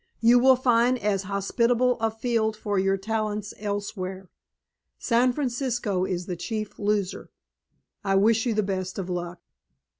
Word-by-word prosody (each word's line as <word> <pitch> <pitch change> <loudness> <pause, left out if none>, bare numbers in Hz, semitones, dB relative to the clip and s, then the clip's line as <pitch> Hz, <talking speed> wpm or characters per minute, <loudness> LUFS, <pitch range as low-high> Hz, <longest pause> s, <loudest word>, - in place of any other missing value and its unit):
You 235 +2 +6
will 260 +1 +6
find 245 0 +3
as 205 -4 0
hospitable 235 +5 +1
a 225 0 +1
field 220 -1 -1
for 205 -2 -1
your 195 +1 +2
talents 215 0 -3
elsewhere. 195 -2 -4 0.7
San 245 +1 +2
Francisco 240 -7 -1
is 180 -2 -3
the 180 - -4
chief 215 +4 -5
loser. 205 -2 -1 0.7
I 195 -1 +1
wish 220 +4 +3
you 230 - 0
the 215 - +2
best 190 -1 -3
of 185 -2 -4
luck." 175 0 -4
215 Hz, 145 wpm, -25 LUFS, 195-235 Hz, 0.7 s, You